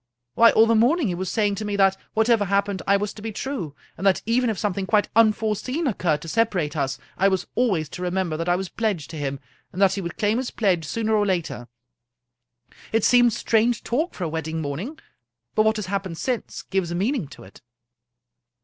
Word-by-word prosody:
Why, 230 0 +7
all 220 - +6
the 230 - +3
morning 245 - +3
he - - -1
was 185 +1 -3
saying 210 -2 +1
to - - -3
me 205 -1 -2
that, 195 -1 +4 0.2
what 220 0 +3
ever 230 -4 +3
happened, 200 0 0
I 200 +1 +5
was 205 0 -3
to 215 - -11
be 225 +1 -4
true; 210 - -5 0.2
and 195 - -1
that 190 - +2
even 240 +2 +2
if 215 - -2
something 195 -1 -2
quite 210 0 +2
unforeseen 225 +7 +2
occurred 170 - 0
to - - -8
separate 180 -6 0
us, 135 -3 -1 0.2
I 195 - +5
was 190 -1 0
always 195 -11 +1
to 180 - -8
remember 180 -2 -1
that 165 +2 -2
I 175 - +4
was 190 +1 -3
pledged 190 -7 -2
to - - -8
him, 140 -2 -3 0.3
and 185 - -8
that 195 -1 +4
he 195 - -3
would 170 -2 -6
claim 215 +2 +1
his 260 - -3
pledge 185 -7 0
sooner 220 +7 -1
or 210 -1 +3
later. 170 -10 -2 1.2
It 225 -1 +1
seemed 245 -2 +5
strange 225 +1 +1
talk 305 +10 -1
for 185 - -5
a 165 - -1
wedding 160 0 -3
morning, 160 - -4 0.6
but 215 - +3
what 220 0 +3
has 210 -2 -3
happened 190 -3 -3
since 250 +3 -3
gives 190 -3 -1
a 175 - -3
meaning 210 - -1
to 135 - -13
it." 95 - -16
200 Hz, 220 wpm, -23 LUFS, 175-225 Hz, 1.2 s, Why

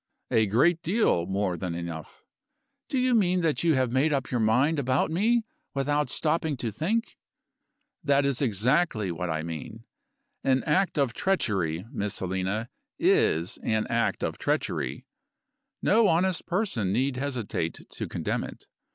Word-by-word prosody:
"A 110 -1 +3
great 160 - +3
deal 170 - +2
more 95 -1 0
than 85 -1 -4
enough." 85 -2 -7 0.7
"Do 270 - -1
you 255 0 +3
mean 185 -5 +3
that 160 -2 0
you 165 -3 +4
have 130 -2 +1
made 135 +5 +2
up 135 -3 -1
your 125 - +1
mind 130 +8 +3
about 130 +3 +1
me 225 +7 +2 0.3
without 145 0 +1
stopping 155 0 0
to 115 -2 -3
think?" 200 - -2 0.8
"That 140 -1 +3
is 140 -1 0
exactly 115 - +1
what 85 +1 -3
I 80 -1 -1
mean. 85 +7 -7 0.6
An 130 -1 +2
act 180 +3 +1
of 135 -5 +2
treachery, 95 - 0
Miss 105 -7 -2
Helena, 95 +4 -2 0.3
is 85 +3 +2
an 110 -1 0
act 115 0 0
of - - -2
treachery; - - -2 0.8
no 220 +1 +5
honest 180 +1 +1
person 175 - 0
need 130 +5 0
hesitate 125 - -3
to - - -5
condemn - - -2
it. - - -9
130 Hz, 150 wpm, -27 LUFS, 100-165 Hz, 0.8 s, no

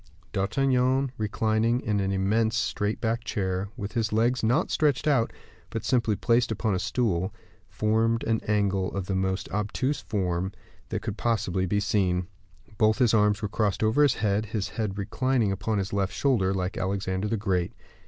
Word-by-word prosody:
D'Artagnan, 130 +5 +1
reclining 110 +2 +1
in 105 -4 -1
an 95 0 0
immense 110 +4 +1
straight 105 +1 -1
backed 115 0 -1
chair, 95 -1 -2
with 105 -2 -4
his 115 -1 -1
legs 120 +4 +2
not 115 +3 +1
stretched 150 -2 +2
out, 130 -6 +3 0.4
but 115 -2 -4
simply 115 -4 +2
placed 120 +3 +2
upon 110 -1 0
a 90 - 0
stool, 100 -3 0 0.4
formed 115 +2 +1
an 115 -1 0
angle 100 -3 +1
of 95 - -2
the 95 - -2
most 95 0 -1
obtuse 105 +7 -1
form 95 -2 -2 0.4
that - - -3
could 110 -2 -4
possibly 95 -6 0
be 105 +3 +1
seen. 95 -3 +1 0.5
Both 110 0 +4
his 125 -4 +3
arms 105 -1 +3
were - - +1
crossed 105 0 0
over 110 +7 +3
his 145 -3 +5
head, 105 0 0
his 105 -2 -2
head 105 -3 -3
reclining 115 +2 0
upon 105 +2 -1
his 100 0 -2
left 100 -1 0
shoulder, 115 -9 +2
like 95 -1 -2
Alexander 95 +1 -1
the 115 +2 0
Great. 95 -4 0
105 Hz, 175 wpm, -27 LUFS, 95-115 Hz, 0.5 s, his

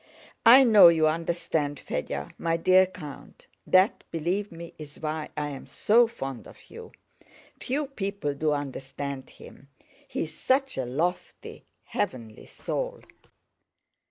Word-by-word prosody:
I 255 +4 +10
know 215 -7 +8
you 160 -2 +4
understand 160 -3 -1
Fédya, 70 0 -4
my 165 0 0
dear 185 +2 +5
count; 155 -7 -11 0.2
that, 185 +3 +4
believe 180 +6 -2
me, 170 0 -10
is 150 -1 -10
why 155 0 -4
I 150 0 -2
am 140 -2 -8
so 235 +3 +4
fond 135 - -7
of - - -17
you. 460 -1 -10 0.7
Few 285 +4 -2
people 200 - -3
do 150 +2 0
understand 140 -1 -5
him. 140 - -15 0.4
He - - -3
is 155 - -7
such 270 +1 +1
a 130 - -2
lofty, 160 +9 -4 0.2
heavenly 115 -4 -4
soul!" - - -4
165 Hz, 130 wpm, -27 LUFS, 145-200 Hz, 0.7 s, I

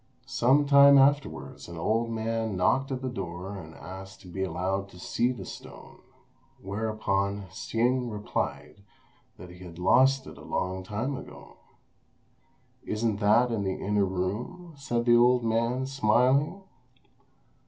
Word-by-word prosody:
Some 135 +2 +3
time 140 0 +8
afterwards 140 +1 +1
an 85 -1 -9
old 115 +7 0
man 115 -1 -2
knocked 135 +9 +1
at 130 0 -3
the - - -1
door 95 -2 -6
and 80 -4 -10
asked 95 +1 -10
to - - -14
be 95 +2 -6
allowed 95 +1 -2
to 90 - -15
see 120 +7 0
the 105 -7 -7
stone; - - -11 0.6
whereupon 100 -1 -2
Hsing 125 +2 0
replied 105 -1 -4 0.6
that 90 -1 -11
he 90 - -14
had 90 -2 -11
lost 130 +8 +4
it - - -11
a - - -12
long 95 0 -2
time 110 +9 -3
ago. - - -11 1.3
"Isn't 110 -1 -1
that 115 +4 +4
it - - -1
in 105 -3 -1
the 95 -1 -2
inner 105 0 +1
room?" 105 - -4
said 120 -4 -2
the 120 -1 +6
old 120 0 +4
man, 115 +3 0
smiling. 135 - +2
110 Hz, 145 wpm, -28 LUFS, 95-130 Hz, 1.3 s, time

